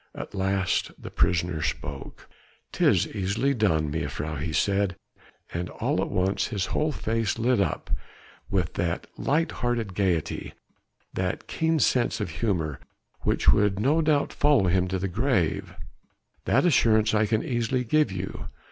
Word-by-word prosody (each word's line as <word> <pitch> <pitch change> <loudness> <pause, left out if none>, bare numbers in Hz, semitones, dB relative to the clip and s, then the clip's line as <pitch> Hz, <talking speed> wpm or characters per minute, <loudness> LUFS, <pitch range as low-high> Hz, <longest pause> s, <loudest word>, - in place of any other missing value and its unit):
At - - -7
last 95 -1 0
the - - -9
prisoner 85 -2 +1
spoke. 70 -1 -5 0.4
"'Tis - - +3
easily 105 +7 0
done, 80 - +1
mejuffrouw," 75 -1 -3
he 80 +1 -2
said, 100 +4 +1 0.6
and 90 +1 -3
all - - -1
at - - -2
once 95 +1 0
his 100 -5 -2
whole 155 0 +1
face 115 -5 -1
lit 120 +1 +2
up 100 - -1 0.6
with 95 -3 0
that 85 -1 -2
light 160 +3 0
hearted 120 -5 -2
gaiety, 90 -5 -1 0.6
that 95 -1 -2
keen 160 0 0
sense 125 -5 +2
of 100 -5 -3
humour 80 - -1 0.4
which - - +2
would 105 -1 +3
no 145 +9 +3
doubt 150 -2 +1
follow 145 -8 +3
him 90 +1 +2
to 95 +1 -1
the 95 +2 -2
grave, 105 - 0 0.7
"that - - +3
assurance 110 -9 +4
I 105 0 +3
can 110 +1 +1
easily 125 0 0
give 150 +1 +2
you. 95 0 -5
100 Hz, 145 wpm, -26 LUFS, 90-120 Hz, 0.7 s, assurance